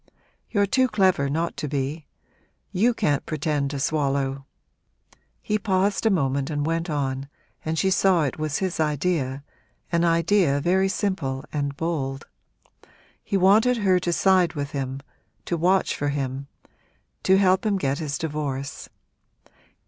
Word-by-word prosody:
You're 200 -2 +2
too 260 +6 +2
clever 190 - +2
not 165 +4 -1
to 150 - -3
be; 145 +2 -3 0.6
you 225 +7 +3
can't 145 - 0
pretend 150 -2 -1
to 140 0 -4
swallow 135 -2 -1 0.5
' - - -35
He 210 0 0
paused 200 +1 +1
a - - +5
moment 140 -6 0
and 145 -1 -1
went 165 +2 -1
on, 135 -2 -2 0.3
and 160 +1 -2
she 190 +3 +2
saw 185 -3 +3
it 145 +1 -3
was 155 -1 -1
his 185 -4 -2
idea 150 -3 0 0.5
an 170 0 +2
idea 170 -2 +3
very 190 +5 +2
simple 150 -10 -2
and 140 -1 -2
bold. 145 -4 -3 1.0
He 200 - 0
wanted 215 +7 +4
her 190 -4 +3
to 175 -1 -1
side 180 -1 +3
with 145 -2 -4
him 135 -1 -4 0.4
to 175 - -1
watch 185 +3 +2
for 145 - -1
him 135 -1 -3 0.7
to 190 - +4
help 190 -1 +3
him 210 -3 +1
to - - -6
get 135 +1 0
his 150 -3 -3
divorce. 145 -3 -4
155 Hz, 150 wpm, -24 LUFS, 140-190 Hz, 1.0 s, a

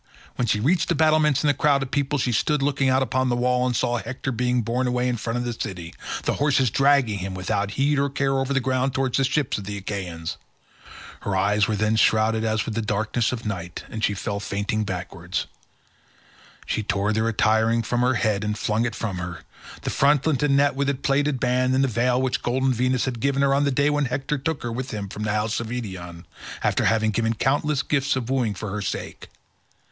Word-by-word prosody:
When 120 - -1
she 105 -1 +2
reached 165 - +2
the 170 - +2
battlements 155 -2 +3
and 150 - +3
the - - +4
crowd 140 0 +2
of 130 - -8
people, 145 +1 0
she 125 -2 0
stood 145 +5 +1
looking 140 -1 +1
out 130 +1 +3
upon 130 +1 0
the 120 - +1
wall, 125 +1 +1
and 125 - -1
saw 120 0 +1
Hector 130 +2 -4
being 125 0 0
borne 125 +3 0
away 125 0 0
in 125 - 0
front 115 +1 -3
of 120 - -2
the 120 - -2
city—the 90 -6 -5
horses 140 -5 +2
dragging 135 -7 +3
him 95 0 -4
without 95 +2 -1
heed 140 +1 +2
or 140 0 +1
care 135 0 0
over 135 +1 -2
the 135 - +3
ground 130 0 0
towards 130 0 +1
the - - +3
ships 135 -2 0
of 100 - -8
the 100 0 -4
Achaeans. 90 -5 -5 0.8
Her 100 - -2
eyes 100 +2 +2
were 110 - 0
then 110 +1 +1
shrouded 110 +1 +3
as 110 -1 0
with 115 - -4
the 115 - -1
darkness 110 +2 0
of 115 -3 -5
night 90 -5 -5
and 110 -1 -5
she 105 - +2
fell 100 +1 -3
fainting 105 +1 -2
backwards. 90 -1 -4 1.2
She - - -1
tore 105 0 0
the 110 +1 +1
attiring 115 0 +2
from 120 +2 -1
her 125 +1 +2
head 105 -2 0
and 105 0 -2
flung 110 +2 0
it 120 -3 -3
from 95 -6 -3
her, 90 -1 -6 0.4
the - - -2
frontlet 145 0 +2
and 140 -2 +3
net 145 0 +3
with 140 +1 0
its 135 -2 -2
plaited 140 0 +1
band, 125 +1 +1
and 135 - +3
the - - +3
veil 125 +1 +1
which 130 -1 0
golden 130 +2 +1
Venus 125 +1 +1
had 125 -3 -3
given 140 +2 +1
her 135 0 +3
on 140 +1 +2
the 140 - +2
day 140 +3 +2
when 145 -1 +1
Hector 135 +3 -2
took 160 +2 -2
her 120 - -3
with 130 +3 -4
him 100 -2 -5
from 105 - -7
the 105 -1 -1
house 105 +2 0
of 115 - -4
Eetion, 95 -8 -6 0.4
after - - +1
having 110 -1 +2
given 115 +1 0
countless 145 +4 +1
gifts 140 -2 +1
of 130 -1 -3
wooing 120 -6 0
for 105 0 -5
her 105 +1 -3
sake. 100 - -5
120 Hz, 225 wpm, -24 LUFS, 105-135 Hz, 1.2 s, the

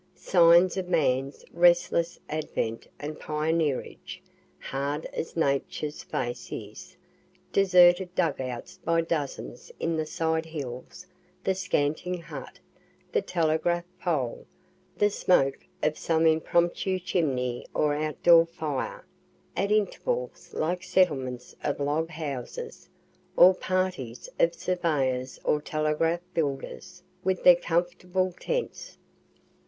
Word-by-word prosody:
Signs 175 +1 +5
of 185 -1 -3
man's 135 -5 0
restless 170 -1 +3
advent 150 -7 -3
and 150 +1 -6
pioneerage, 155 +2 -2 0.4
hard 140 +3 -3
as 165 - -5
Nature's 150 0 -1
face 120 0 -4
is - - -8 0.6
deserted 180 -1 +5
dug - - +1
outs 125 -2 -6
by 165 0 +2
dozens 165 - -4
in 165 -1 0
the 155 -1 -2
side 160 0 -1
hills 140 +2 -7 0.4
the 190 - +2
scantling 180 -1 -1
hut, 170 - -9 0.5
the 450 - +2
telegraph 170 - 0
pole, 145 -9 -2 0.5
the 205 0 +3
smoke 135 -9 +2 0.2
of 155 0 +1
some 165 -1 +1
impromptu 170 +4 +2
chimney 135 -9 -1
or 150 -1 +1
outdoor 165 +3 +4
fire 155 -5 -4 0.5
at 200 +1 0
intervals 480 - -1
little 180 +3 -1
settlements 130 -11 0
of 145 - -1
log 150 +3 0
houses, 145 -6 -6 0.5
or 185 +2 +9
parties 185 -11 -2
of 170 0 +3
surveyors 140 -9 -1
or 150 - +1
telegraph 155 +3 0
builders, 165 +4 -3 0.2
with 190 0 0
their 180 - +9
comfortable 175 +2 -1
tents. - - -3
165 Hz, 110 wpm, -27 LUFS, 145-180 Hz, 0.6 s, or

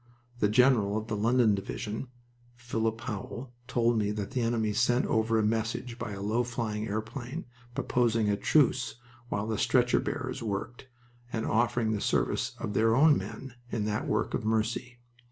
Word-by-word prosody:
The 105 - +3
general 110 -3 +4
of 110 +1 -4
the 110 - -1
London 115 +1 +3
Division 110 +4 -4 0.5
(Philip 115 -2 -2
Howell) 120 +3 -6
told 120 -2 +2
me 105 -1 0
that 105 -2 -4
the 125 - -1
enemy 115 -2 +1
sent 120 +3 +2
over 110 0 +2
a 110 - +2
message 115 +2 -1
by 110 -3 -4
a 100 0 -6
low 110 +4 +1
flying 115 -3 -3
airplane, 120 +8 -4 0.3
proposing 115 -3 +1
a 105 - +3
truce 130 +3 +2 0.3
while 105 -2 -1
the 110 -1 -2
stretcher 125 -1 +3
bearers 130 -1 -3
worked, 115 +4 -4 0.4
and 110 -2 -2
offering 115 0 +1
the 105 -2 -1
service - - 0
of 105 - -4
their 115 +2 +3
own 150 +3 +6
men 135 -2 -6 0.2
in 110 -3 -1
that 105 0 -1
work - - 0
of - - -1
mercy. 110 +3 -1
115 Hz, 170 wpm, -29 LUFS, 110-125 Hz, 0.5 s, own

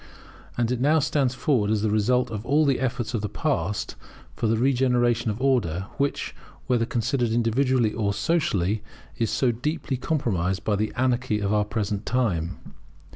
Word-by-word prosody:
And 120 0 +1
it 125 -1 -1
now 150 +4 +4
stands 140 -4 +1
forward 120 -7 +1
as 110 -1 +1
the 110 - +1
result 125 +3 +2
of 105 -1 -4
all 145 +5 +3
the 135 -3 +2
efforts 125 -2 -2
of 115 - -1
the 105 - -3
past, 105 - -2 0.4
for 115 - -1
the 110 +1 +2
regeneration 125 -2 +2
of 105 +2 -3
order, 115 -10 +1
which, 140 0 -1 0.3
whether 120 -2 +1
considered 120 0 0
individually 120 0 +2
or 105 -3 0
socially, 105 - 0 0.4
is 115 -2 +1
so 130 -3 +2
deeply 140 +3 -3
compromised 95 - -1
by 105 - +1
the 105 +2 -1
anarchy 125 -3 +1
of 100 -1 -1
the 105 -1 +3
present 105 -1 -2
time. 95 -9 -1
120 Hz, 170 wpm, -25 LUFS, 105-130 Hz, 0.4 s, now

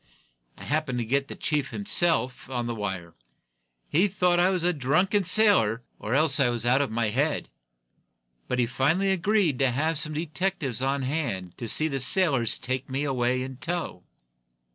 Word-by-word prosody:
I - - -11
happened 150 -4 -1
to 120 - -2
get 140 +4 0
the - - -8
chief 150 -3 -1
himself 165 -12 0
on 120 -2 -2
the 120 - -3
wire. 95 -6 -5 0.7
He 180 +7 +2
thought 180 -2 +1
I 180 +1 +4
was 185 -3 -1
a 180 +1 +2
drunken 180 +9 +1
sailor, 180 - +3 0.2
or 110 +5 -2
else 150 -1 +3
that 140 -4 +4
I - - +1
was 120 -1 -3
out 130 +3 +3
of 140 - -1
my 110 0 -1
head. 145 +6 -1 1.0
But 125 - -2
he 125 - +2
finally 145 +11 +1
agreed 190 -6 +1
to 135 -1 +3
have 150 +5 0
some 155 -1 0
detectives 155 - -2
on 135 +1 0
hand 125 - -3
to 120 - -5
see 155 +8 +1
the 135 -3 -2
sailors 135 - +2
take 130 +1 -4
me 135 +2 -2
away 130 -2 0
in 130 -1 -7
tow." 170 - -4
140 Hz, 185 wpm, -26 LUFS, 125-170 Hz, 1.0 s, I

